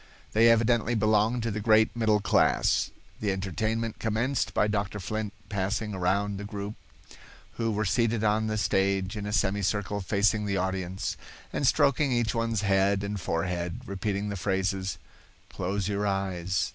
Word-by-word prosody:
They 115 +2 +6
evidently 115 0 +3
belonged 110 +2 +2
to 115 - -1
the 105 - -3
great 110 +1 +4
middle 110 -2 +2
class. - - +2 0.3
The 105 -2 0
entertainment 110 +4 -2
commenced 115 +2 0
by 105 - +2
Dr. 105 -1 -2
Flint 110 +2 -3 0.2
passing 105 +2 -2
around 100 +2 0
the - - -5
group, 100 0 -5 0.8
who 115 -1 0
were 105 +1 -1
seated 115 +2 +1
on 110 +1 +2
the 110 0 -1
stage 95 -1 +1
in 105 -1 -4
a - - -3
semicircle 100 0 0
facing 105 +2 +1
the 100 -1 0
audience, 95 0 -2 0.4
and - - +1
stroking 140 0 +3
each 120 -4 +1
one's 115 -2 0
head 100 0 +2
and 100 -1 -3
forehead, 90 +4 -2
repeating 100 0 -2
the 100 - -3
phrases, 95 0 -1 0.5
"Close 95 +1 -2
your 105 0 -1
eyes. 95 -2 -1
105 Hz, 155 wpm, -28 LUFS, 95-110 Hz, 0.8 s, They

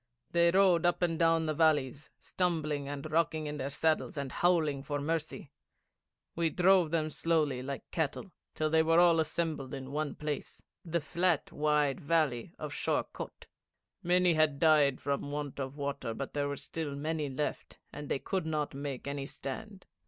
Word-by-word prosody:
They 170 0 +4
rode 185 -2 +4
up 175 +1 +2
and 165 -2 0
down 165 -1 +3
the 155 - 0
valleys, 145 -3 +1
stumbling 155 -6 -1
and 145 +1 -5
rocking 160 -1 +1
in 150 0 -4
their 135 0 -3
saddles, 155 +2 0
and 140 -2 -3
howling 160 -6 +2
for 145 +1 -3
mercy. 155 -1 -3 0.8
We 165 -1 +1
drove 180 -1 +4
them 155 -1 0
slowly 150 -6 +1
like 135 +1 -5
cattle 165 +5 -2 0.2
till 155 0 0
they 160 0 +5
were 165 +1 +4
all 170 -2 +6
assembled 155 -4 -2
in 135 0 -7
one 150 0 -2
place, 150 -2 -5 0.2
the 170 -1 -1
flat 170 +2 0
wide 150 -2 +1
valley 145 -6 +1
of - - -6
Sheor - - 0
Kôt. - - -8 0.6
Many 180 0 +3
had 155 -3 +3
died 150 -3 +4
from 140 0 -2
want 145 -1 -4
of 135 +1 -4
water, 140 -5 -3
but 140 - -5
there 145 -1 -1
still 160 +2 -5
were 140 - -5
many 150 0 -2
left, 135 +3 -4 0.2
and 145 0 -7
they - - +1
could 185 +4 -3
not 150 -2 -1
make 140 -2 -5
any 140 -1 -4
stand. 195 +10 -7
155 Hz, 175 wpm, -31 LUFS, 140-165 Hz, 0.8 s, all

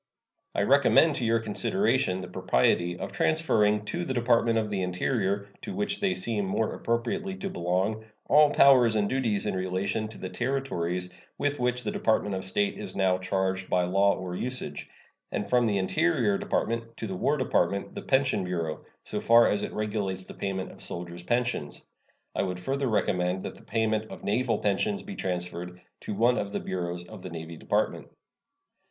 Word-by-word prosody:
I - - +2
recommend 140 +4 +5
to 120 - -1
your 115 0 +3
consideration 115 - 0
the 90 - -6
propriety 85 +8 +1
of - - -5
transferring 105 -10 +2
to 175 +10 -3
the 130 -6 -3
Department 115 -1 +3
of 110 -1 +1
the 100 -2 -1
Interior, 100 +2 -1
to 200 - -6
which 205 0 -1
they 195 -2 +1
seem 110 -3 -1
more 105 +3 0
appropriately 120 - -2
to 195 0 -5
belong, 95 - -1 0.2
all 150 0 +6
powers 125 -6 +6
and 105 -1 +2
duties 115 -5 0
in - - 0
relation 95 +4 -1
to 110 - -11
the 95 - -6
Territories 90 -9 -2 0.2
with 145 0 -1
which 125 0 0
the 105 - -1
Department 105 -2 +1
of 95 0 -3
State 100 +2 0
is - - -6
now 95 -1 +2
charged 95 0 -1
by 90 0 +3
law 100 +3 +3
or 90 -1 -5
usage; 125 +5 -4 0.4
and 100 - -2
from 125 -2 +3
the 105 -2 +1
Interior 100 +2 +2
Department 115 +2 -2
to - - -4
the 95 -3 -4
War 145 +11 +1
Department 100 -7 0
the - - -5
Pension 130 -7 +2
Bureau, 85 -4 -3 0.2
so - - -4
far 115 0 +6
as 100 - 0
it - - -3
regulates 105 -3 -2
the - - -10
payment 95 -1 -3
of - - -14
soldiers' 85 0 -6
pensions. 120 -6 -1 0.5
I - - 0
would 90 -2 -2
further 135 +7 -1
recommend 95 -4 0
that - - -5
the - - -16
payment 110 -1 0
of - - -10
naval 115 +2 +1
pensions 105 - 0
be 205 - -7
transferred 90 - -4 0.2
to 105 - -5
one 120 +4 +3
of 100 0 -4
the - - 0
bureaus 90 -1 -4
of - - -10
the 95 - -7
Navy 85 0 -7
Department. - - -1
105 Hz, 185 wpm, -28 LUFS, 95-125 Hz, 0.5 s, all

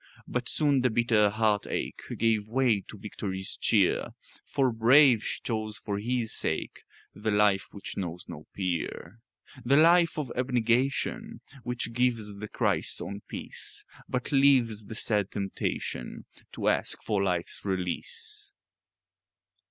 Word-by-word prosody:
But 125 0 -2
soon 145 -4 +2
the 125 - +3
bitter 110 -2 +3
heart 105 -1 +1
ache - - -3 0.2
Gave 110 -2 +1
way 120 -2 +2
to 110 - -9
victory's 95 -2 -4
cheer; - - +2 0.3
For, 135 -2 +1
brave, 120 +1 +6
she - - -3
chose 110 -2 -3
for 100 -1 -3
His 120 +1 -1
sake - - -2 0.3
The 110 +2 -3
life 105 -2 +3
which 100 - -8
knows 90 -2 -4
no 75 - -9
peer; 90 +1 -3 0.4
The 135 +4 +4
life 170 +2 +5
of 145 -5 -3
abnegation 130 - 0 0.2
Which 120 -1 -3
gives 115 -4 0
the 105 +1 -6
Christ's - - 0
own 100 +1 -6
peace, - - -7 0.2
But 125 -1 -2
leaves 130 -6 +4
the 110 - -8
sad 105 -3 +1
temptation 95 -10 -4 0.3
To - - -3
ask - - +1
for 105 -3 0
life's 90 -3 -2
release. 410 - -4
115 Hz, 135 wpm, -28 LUFS, 100-125 Hz, 0.4 s, brave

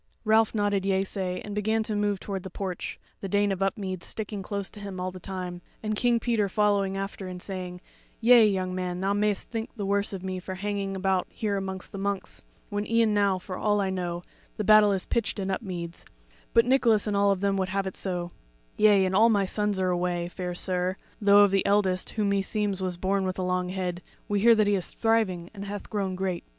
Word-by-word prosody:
Ralph 220 +1 +4
nodded 205 -2 +1
yeasay 190 -1 -1
and 205 - -6
began 220 +2 +1
to 215 -1 -2
move 205 -1 0
toward 195 -1 -4
the 190 - -7
porch, 185 -1 -5 0.2
the 195 - -5
Dame 205 +1 +2
of 195 0 -3
Upmeads 195 -2 -2
sticking 210 -2 -4
close 200 0 -3
to 210 - -10
him 200 -2 -6
all 185 0 -2
the 185 - -9
time, 180 -1 -6 0.2
and 215 0 -1
King 240 +1 +2
Peter 225 -4 +1
following 200 -1 +1
after 195 -1 -5
and 180 0 -6
saying: 180 -1 -6 0.4
"Yea, 235 -1 +7
young 185 -2 -1
man, 180 -1 -3
thou 195 +1 +1
mayst 205 0 0
think 225 -1 -3
the 205 -4 -3
worse 200 +1 +1
of 190 -2 -6
me 185 -1 -3
for 185 +1 -6
hanging 200 0 -3
about 190 -1 0
here 210 -2 -2
amongst 190 -1 -4
the 195 - -6
monks, 200 0 -3 0.3
when 205 0 -2
e'en 230 -1 +3
now, 200 -2 +3
for 185 0 -7
all 205 +2 +1
I 195 -1 0
know, 175 -2 -3 0.3
the 215 - -1
battle 215 0 +7
is 190 -2 -1
pitched 230 -2 -1
in 195 -1 -2
Upmeads; 180 -4 -5 0.5
but 230 - +5
Nicholas 240 -5 +3
and 210 -2 -1
all 200 0 +4
of 195 -2 +1
them 200 -1 +2
would 190 -1 -1
have 195 +1 -1
it 190 - -4
so 180 -2 -3 0.5
Yea, 205 -3 +5
and 185 - -1
all 220 +4 +6
my 200 -3 +3
sons 210 0 -1
are 185 -1 +1
away, 175 -1 -1
fair 180 -1 -5
sir; 180 0 0 0.3
though 205 0 +7
of 200 - +4
the 195 -1 +2
eldest, 195 -2 +2
who 215 -2 0
meseems 200 0 0
was 180 -2 -2
born 195 +2 0
with 185 -1 -2
a 185 - -1
long 180 0 0
head, 180 -1 -3 0.3
we 205 -1 +1
hear 230 +3 +6
that 215 -1 +3
he 205 - +2
is 190 -3 0
thriving, 215 -7 0
and 200 -1 -7
hath 205 0 -7
grown 195 -3 -1
great." 185 -2 -2
195 Hz, 225 wpm, -27 LUFS, 185-205 Hz, 0.5 s, Yea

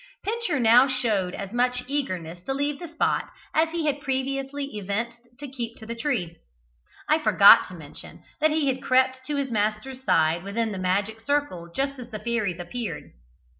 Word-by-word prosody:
Pincher 425 - -1
now 240 +3 +6
showed 220 -8 0
as 200 -1 -6
much 250 +1 +1
eagerness 185 - -3
to 270 - -1
leave 285 +1 -1
the 345 - -6
spot 325 0 0 0.2
as 320 +1 +3
he 330 -1 -2
had 290 -1 0
previously 275 +1 -2
evinced 210 +4 -3 0.2
to 290 - -6
keep 240 -3 -5
to 220 - -11
the 230 - -4
tree. 230 - -2 0.7
I 310 +1 +3
forgot 310 - +7
to - - -10
mention - - -12 0.2
that 310 +1 +4
he 310 -1 +1
had 265 -1 0
crept 260 0 +2
to 295 - -1
his 275 -3 -2
master's 215 +5 -2
side 165 -4 +2
within 220 +3 -2
the 195 - -5
magic 200 +4 -1
circle 225 -11 -1
just 275 +5 -2
as 245 -1 -8
the 220 - -5
fairies 215 -5 -1
appeared. 215 +6 -5
250 Hz, 180 wpm, -25 LUFS, 210-280 Hz, 0.7 s, forgot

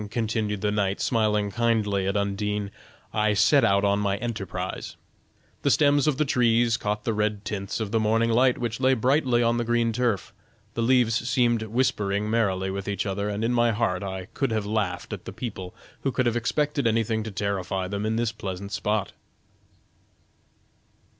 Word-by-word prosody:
continued 110 -3 -2
the 105 - +1
knight, 100 -2 0
smiling 105 -3 +1
kindly 105 -3 +1
at 100 +1 0
Undine, 100 0 -2 0.4
"I 105 -1 +2
set 140 +6 +4
out 100 -2 +3
on 100 0 +2
my 100 -1 0
enterprise. 95 -5 -5 0.7
The - - +1
stems 145 -1 +4
of 145 -4 +2
the 155 - +2
trees 120 -3 +3
caught 105 -1 -2
the 115 - 0
red 105 0 -1
tints 100 0 -3
of 110 -3 -3
the 115 - +2
morning 115 +2 +2
light 125 +2 +3
which 115 -1 -3
lay 130 0 +3
brightly 125 0 +2
on 115 0 +2
the 120 - 0
green 120 0 +1
turf, 115 -5 -1 0.4
the 115 - -2
leaves 120 -1 +2
seemed 120 -2 +2
whispering 105 -3 0
merrily 95 -4 +1
with 100 0 -5
each 100 0 -2
other, 100 +1 -2
and 105 +1 -3
in 120 +2 +1
my 120 -1 +3
heart 105 -5 0
I 95 -2 -5
could 135 - 0
have 110 -2 -1
laughed 100 -4 -2
at - - -7
the - - -6
people 95 -7 -6 0.3
who 135 - 0
could 130 0 0
have 120 -1 +1
expected 140 +3 0
anything 110 0 +1
to 110 - -5
terrify 95 -2 -2
them 100 +2 -3
in 110 +1 0
this 115 -1 0
pleasant 100 -2 -6
spot. 105 -1 -1
110 Hz, 180 wpm, -25 LUFS, 100-120 Hz, 0.7 s, set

